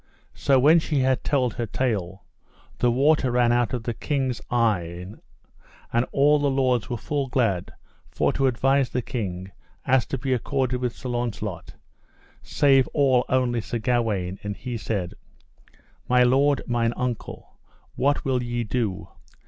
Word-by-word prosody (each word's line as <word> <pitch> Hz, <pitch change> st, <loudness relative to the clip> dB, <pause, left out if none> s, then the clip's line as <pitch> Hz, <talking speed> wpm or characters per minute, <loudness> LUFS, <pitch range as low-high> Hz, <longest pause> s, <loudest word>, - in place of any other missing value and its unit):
So 135 Hz, -1 st, +2 dB
when 150 Hz, +6 st, +6 dB
she 150 Hz, -3 st, -1 dB
had 130 Hz, 0 st, +1 dB
told 130 Hz, -6 st, +1 dB
her 115 Hz, -, -3 dB
tale, 100 Hz, -6 st, -2 dB, 0.5 s
the 120 Hz, -, +3 dB
water 135 Hz, +2 st, +3 dB
ran 120 Hz, -1 st, +3 dB
out 120 Hz, -1 st, +1 dB
of 125 Hz, -3 st, -3 dB
the 120 Hz, -, -2 dB
king's 130 Hz, -2 st, -2 dB
eyen, 95 Hz, -5 st, -1 dB, 0.7 s
and 120 Hz, +1 st, +2 dB
all 145 Hz, +2 st, +4 dB
the 145 Hz, 0 st, +1 dB
lords 130 Hz, -4 st, +1 dB
were 120 Hz, -, -2 dB
full 140 Hz, +4 st, -2 dB
glad 115 Hz, -9 st, 0 dB, 0.4 s
for -, -, 0 dB
to 135 Hz, -, +1 dB
advise 135 Hz, +2 st, +2 dB
the 125 Hz, -, -2 dB
king 95 Hz, -5 st, -5 dB, 0.3 s
as 130 Hz, -1 st, +2 dB
to 135 Hz, -, -3 dB
be 130 Hz, +1 st, -1 dB
accorded 130 Hz, 0 st, -1 dB
with 125 Hz, -2 st, -2 dB
Sir 130 Hz, -, -7 dB
Launcelot, 115 Hz, -6 st, -4 dB, 0.7 s
save 135 Hz, -2 st, +3 dB
all 130 Hz, -4 st, +3 dB
only 125 Hz, -2 st, +1 dB
Sir 120 Hz, -, -4 dB
Gawaine, 110 Hz, -6 st, -1 dB
and 105 Hz, -1 st, -5 dB
he 125 Hz, -1 st, -5 dB
said: 100 Hz, -5 st, -3 dB, 1.0 s
My 125 Hz, 0 st, +5 dB
lord 135 Hz, +3 st, +3 dB
mine 120 Hz, -1 st, 0 dB
uncle, 125 Hz, -2 st, -5 dB, 0.3 s
what 140 Hz, +2 st, 0 dB
will 130 Hz, -2 st, +1 dB
ye 120 Hz, 0 st, -2 dB
do? 110 Hz, -4 st, -2 dB
125 Hz, 155 wpm, -24 LUFS, 115-135 Hz, 1.0 s, when